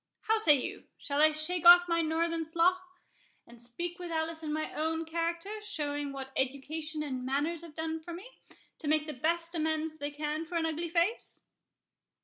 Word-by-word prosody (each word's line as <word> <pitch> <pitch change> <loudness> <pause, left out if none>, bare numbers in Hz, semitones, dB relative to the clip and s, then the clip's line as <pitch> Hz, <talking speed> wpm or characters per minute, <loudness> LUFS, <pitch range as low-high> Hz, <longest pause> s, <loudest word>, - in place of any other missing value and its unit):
How 445 0 +2
say 310 -9 +6
you?—shall 280 +2 -3
I 310 0 +7
shake 310 +3 0
off 350 0 +9
my 335 -1 +2
northern 330 +1 0
slough, 340 +3 +2 0.6
and 235 0 -15
speak 345 +9 -5
with 355 -1 -6
Alice 320 0 -2
in 310 -1 -4
my 310 +1 -2
own 320 +1 -1
character, 335 +6 -3
showing 290 -7 -3
what 270 -1 -7
education 300 +4 -2
and 260 -4 -4
manners 290 +6 -1
have 330 -3 -12
done 320 0 -3
for 320 +2 -9
me, 345 +3 -7 0.5
to 310 - -6
make 305 0 +2
the 305 - -5
best 335 +5 -1
amends 315 -1 -1
they 290 0 -2
can 300 +2 -3
for 350 - -6
an 330 -1 +1
ugly 325 +1 -2
face?" 345 +7 0
320 Hz, 180 wpm, -31 LUFS, 300-335 Hz, 0.6 s, off